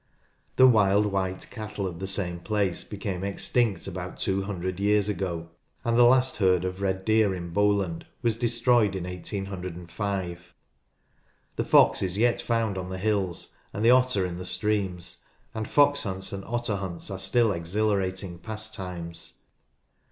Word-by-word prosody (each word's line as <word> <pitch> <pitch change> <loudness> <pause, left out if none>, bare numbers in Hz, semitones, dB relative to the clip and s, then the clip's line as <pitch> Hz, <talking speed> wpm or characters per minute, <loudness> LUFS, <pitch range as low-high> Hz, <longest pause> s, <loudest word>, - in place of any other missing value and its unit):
The 130 - +7
wild 105 -4 +5
white 95 -2 -2
cattle 105 -3 -5
of 85 -3 -5
the 95 - -4
same 90 -3 0
place 100 -2 -1
became 95 -2 -5
extinct 100 +2 0
about 90 -1 -6
two 95 0 0
hundred 95 -2 -4
years 105 0 +3
ago, 85 -4 -3 0.3
and 115 0 +1
the 120 0 +7
last 130 +1 +4
herd 95 -3 +3
of 95 +1 -4
red 95 -1 -1
deer 110 -3 +3
in 85 -1 -6
Bowland 100 -3 +1 0.2
was 115 -2 +2
destroyed 120 -3 +2
in 95 - -3
1805. 90 -1 -5 1.0
The - - 0
fox - - +5
is 95 0 -1
yet 120 +2 +2
found 115 -4 0
on 90 0 -6
the 95 - -4
hills, 95 -3 -1 0.2
and 105 +3 -1
the 120 - +7
otter 125 -6 +3
in 90 -1 -4
the 90 - -6
streams, 100 -5 -1 0.3
and 110 -1 -4
fox 145 0 +4
hunts 95 -2 -4
and 100 0 -5
otter 120 -3 -1
hunts 95 -1 -4
are 95 - -4
still 110 +4 +3
exhila 100 +4 0
rating 95 -2 -4
pastimes. 95 -5 -4
100 Hz, 160 wpm, -27 LUFS, 90-110 Hz, 1.0 s, The